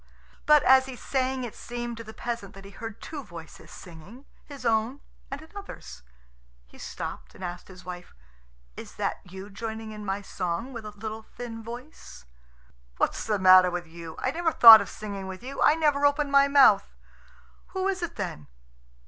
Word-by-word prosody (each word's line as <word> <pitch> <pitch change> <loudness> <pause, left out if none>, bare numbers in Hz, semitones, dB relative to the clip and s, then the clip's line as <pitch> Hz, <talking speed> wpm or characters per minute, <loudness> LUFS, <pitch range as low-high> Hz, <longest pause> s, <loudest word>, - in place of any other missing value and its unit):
But 300 -1 +6
as 265 0 +6
he 260 - -7
sang 260 0 -2
it 235 - -6
seemed 240 0 -6
to 230 - -7
the 220 - -10
peasant 230 -4 -6
that 195 0 -12
he 200 - -11
heard 225 +1 -8
two 295 -3 -7
voices 170 -6 -12
singing 185 - -13 0.2
his 275 -4 -10
own 230 +4 +1 0.3
and 280 +2 -6
another's. 320 - -10 0.6
He 60 - -19
stopped, - - -7
and 185 - -11
asked 175 0 -6
his 185 -2 -14
wife, 180 -1 -9 0.6
"Is - - -10
that - - -2
you 190 +3 -10
joining 220 +1 -6
in 210 -1 -8
my 200 0 -3
song 190 +7 -4
with 230 -2 -7
a - - -5
little 215 +1 -7
thin 230 0 -9
voice?" 240 - -10 0.7
"What's - - -1
the 210 -2 +1
matter 185 -1 +7
with 175 0 -4
you? 165 0 -10
I 260 - -1
never 330 +2 0
thought 225 -6 +11
of 200 - -6
singing 200 -3 -7
with 190 +3 -8
you. 270 +2 -6
I 300 - +5
never 295 -3 +1
opened 285 0 +2
my 280 0 +6
mouth." 270 -8 +5 0.7
"Who 380 0 -2
is 380 -1 -1
it 345 - -4
then?" 175 - -5
225 Hz, 180 wpm, -27 LUFS, 190-265 Hz, 0.7 s, thought